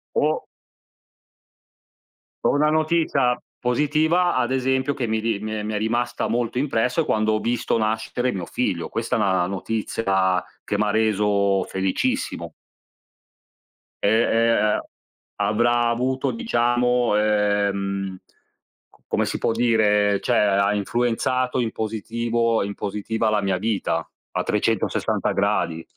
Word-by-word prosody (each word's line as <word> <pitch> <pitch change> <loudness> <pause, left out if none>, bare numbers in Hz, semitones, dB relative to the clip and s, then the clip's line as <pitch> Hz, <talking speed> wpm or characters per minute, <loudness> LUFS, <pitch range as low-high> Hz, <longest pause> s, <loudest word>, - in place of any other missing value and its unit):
O - - +1 2.0
O - - +3
una 150 +1 +3
notizia 155 -5 +2 0.2
positiva, 155 +7 +2
ad 130 0 0
esempio, 130 +1 +1
che 120 -4 -3
mi 110 0 0
ri 110 -2 -1
mi 110 +1 -5
è 105 -1 -3
mi 110 0 -3
è - - 0
rimasta 120 +3 -1
molto 120 +1 -1
impresso 125 +1 +1
è - - -2
quando 110 0 +1
ho 110 - +1
visto 120 0 0
nascere 110 +3 -1
mio 90 -3 -4
figlio. - - -2
Questa - - -2
è - - +1
una 95 -2 +2
notizia 95 -2 0 0.2
che 105 - -2
m'ha 105 0 +1
reso 105 -2 +2
felicissimo. 95 0 -2 1.5
Ehm 110 +3 +3
ehm, 115 -2 +2 0.6
avrà 120 +2 +2
avuto, 130 +3 0
diciamo, 125 - +1
ehm, 100 -2 0 0.7
c - - -25
come - - 0
si - - -2
può - - +1
dire, 105 -3 +2
cioè, - - +1
ha 100 0 +3
influenzato 125 +4 0
in 115 -2 0
positivo 115 +1 -1
in 100 +1 -4
positiva, 105 +2 -2
la 105 -1 +1
mia 95 -2 0
vita 105 0 -1 0.2
a - - -1
360 - - 0
gradi. 80 0 0
110 Hz, 130 wpm, -23 LUFS, 105-125 Hz, 2.0 s, O